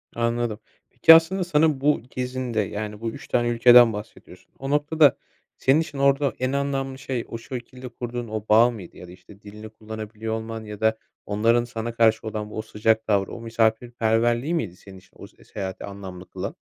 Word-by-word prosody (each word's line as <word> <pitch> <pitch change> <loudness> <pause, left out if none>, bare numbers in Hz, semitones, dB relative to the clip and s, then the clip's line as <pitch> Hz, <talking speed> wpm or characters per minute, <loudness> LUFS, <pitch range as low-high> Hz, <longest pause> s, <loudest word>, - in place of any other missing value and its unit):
Anladım. 115 -2 -1 0.3
Peki 165 - +7
aslında 175 +4 +2
sana 155 -4 +2
bu 150 +1 +2
gezinde, 125 -2 -3
yani 105 +1 -5
bu 115 - -2
3 - - -11
tane 120 -1 +1
ülkeden 120 0 +6
bahsediyorsun. 105 +2 -11
O 135 - -5
noktada 145 0 +3 0.4
senin 135 +4 +3
için 155 -3 -7
orada 140 -1 +2
en 130 +1 0
anlamlı 135 -1 -2
şey, 130 -3 -4
o 115 - -5
şekilde 125 0 -8
kurduğun 120 0 -6
o 110 -1 -5
bağ 115 +3 +6
mıydı 100 -7 -11
ya 90 - -11
da - - -12
işte 100 +2 -16
dilini 105 +1 -11
kullanabiliyor 110 0 -7
olman 110 0 -5
ya 105 -1 -9
da 110 0 +2 0.3
onların 115 +3 +2
sana 115 -1 -5
karşı 110 -1 +3
olan 105 -1 -5
o 110 - -3
sıcak 110 +1 0
tavrı, 100 -2 +1
o 120 - -8
misafirperverliği 115 +3 0
miydi 110 - -2
senin 95 0 -14
için 95 - -19
o - - -10
s - - -23
seyahati 95 -2 -6
anlamlı 95 -2 -9
kılan? - - -6
115 Hz, 185 wpm, -24 LUFS, 110-130 Hz, 0.4 s, Peki